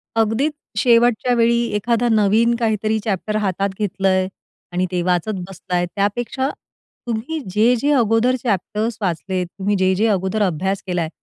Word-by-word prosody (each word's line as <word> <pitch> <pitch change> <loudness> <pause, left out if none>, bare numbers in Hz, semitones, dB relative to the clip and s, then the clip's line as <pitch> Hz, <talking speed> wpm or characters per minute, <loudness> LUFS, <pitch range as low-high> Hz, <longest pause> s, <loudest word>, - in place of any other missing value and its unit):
अगदीच 225 +7 +1 0.2
शेवटच्या 240 +1 +3
वेळी 235 0 +3
एखादा 235 +3 +1
नवीन 220 +2 +3
काहीतरी 220 -1 0
चॅप्टर 215 0 -2
हातात 195 +1 0
घेतलंय 190 -2 +1 0.4
आणि 180 +1 0
ते 180 -1 0
वाचत 180 +3 0 0.2
बसलाय, 180 -1 -2
त्यापेक्षा 240 +6 -1 0.6
तुम्ही 235 +8 -3
जे-जे 235 +7 +3
अगोदर 230 +3 +2
चॅप्टर 210 0 -1
वाचलेत, 185 0 -1
तुम्ही 205 +2 +1
जे-जे 190 +4 +2
अगोदर 195 +1 0
अभ्यास 190 +2 -1
केलाय, 170 -3 -1
210 Hz, 130 wpm, -20 LUFS, 190-230 Hz, 0.6 s, शेवटच्या